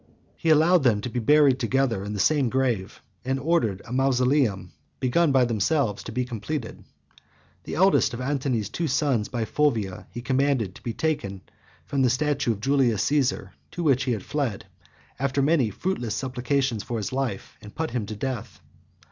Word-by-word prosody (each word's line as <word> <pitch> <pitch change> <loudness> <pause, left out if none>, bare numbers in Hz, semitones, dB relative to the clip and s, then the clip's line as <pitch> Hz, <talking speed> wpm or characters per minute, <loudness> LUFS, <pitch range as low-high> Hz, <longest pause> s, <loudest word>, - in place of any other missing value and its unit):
He 165 - -2
allowed 160 +3 +5
them 120 -6 +3
to 125 - -4
be 120 - -2
buried 140 +2 +4
together 120 -4 0
in 105 +1 -5
the 105 - -4
same 140 +3 +3
grave, 120 -6 -1 0.2
and 130 +1 -1
ordered 135 - 0
a 120 - -7
mausoleum, 130 -4 +1 0.3
begun 145 +5 +2
by 130 -2 +4
themselves, 115 0 0
to - - -6
be 125 +2 -1
completed. 120 +2 -5 0.8
The - - -5
eldest 190 -7 +3
of - - -7
Antony's 130 -5 -1
two 165 +9 -3
sons 130 -6 +1
by 120 -3 -2
Fulvia 110 -10 -1
he 120 - -8
commanded 130 -7 +1
to - - -14
be 120 - -3
taken 150 -11 -1
by - - -9
force - - -32 0.3
from 140 -1 -1
the 130 - +4
statue 140 0 +1
of 105 - -10
Julius 125 -5 +2
Caesar, 140 -3 0 0.2
to 175 - -5
which 135 -3 +2
he 125 - +1
had 105 -5 -4
fled, 135 -11 -3 0.5
after 140 +1 0
many 140 -6 +3
fruitless 120 - -3
supplications 130 -2 -1
for 115 +4 -4
his 110 +3 -4
life, 130 -7 -3
and 105 - -12
put 160 0 -2
him 115 -5 -2
to 110 - -5
death. 120 0 -5
130 Hz, 185 wpm, -25 LUFS, 115-140 Hz, 0.8 s, allowed